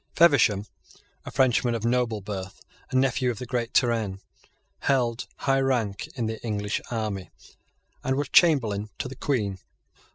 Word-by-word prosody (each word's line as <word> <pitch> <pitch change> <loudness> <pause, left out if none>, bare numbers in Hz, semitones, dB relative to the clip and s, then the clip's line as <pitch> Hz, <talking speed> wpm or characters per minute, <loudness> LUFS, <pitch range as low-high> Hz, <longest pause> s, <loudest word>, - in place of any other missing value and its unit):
Feversham, 115 - +5 0.6
a - - -5
Frenchman 120 -2 +2
of 115 0 -3
noble 120 -3 +1
birth, 95 -1 -6 0.3
and 130 - +2
nephew 130 -1 +2
of 120 - -2
the 125 - -5
great 120 -1 -2
Turenne, 115 -6 +1 0.6
held 125 -4 0
high 135 -1 +2
rank 115 -7 0
in 120 -4 -1
the 110 0 -4
English 105 -2 -2
army, 105 -5 -3 0.7
and 130 - +1
was 145 +1 -2
Chamberlain 110 - +4
to - - -3
the 130 - -8
Queen. 105 -10 -1
115 Hz, 150 wpm, -26 LUFS, 105-130 Hz, 0.7 s, Feversham